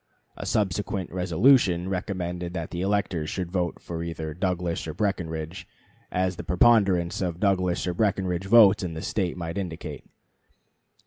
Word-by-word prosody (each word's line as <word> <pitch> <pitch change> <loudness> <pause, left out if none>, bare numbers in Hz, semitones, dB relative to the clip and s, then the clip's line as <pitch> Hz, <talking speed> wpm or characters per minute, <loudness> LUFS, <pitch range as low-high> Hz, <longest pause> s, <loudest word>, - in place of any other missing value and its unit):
A - - -6
subsequent 100 -2 -1
resolution 90 +2 +4
(August - - -6
9) - - -4
recommended 90 -2 -3
that 85 -2 -4
the 85 - -3
electors 95 -5 0
should 90 -2 -4
vote 90 -3 -1
for 85 -1 -6
either 80 -2 -4
Douglas 90 -1 -2
or 80 - -5
Breckinridge, 85 -5 -3 0.4
as 90 0 0
the - - -5
preponderance 95 -4 +3
of 90 -2 -2
Douglas 90 -3 +1
or 90 - -1
Breckinridge 95 -2 0
votes 105 -1 +7
in 85 -3 -4
the 80 - -5
State 95 -3 -1
might 85 +1 -4
indicate. 85 -4 -6
90 Hz, 155 wpm, -26 LUFS, 85-95 Hz, 0.4 s, votes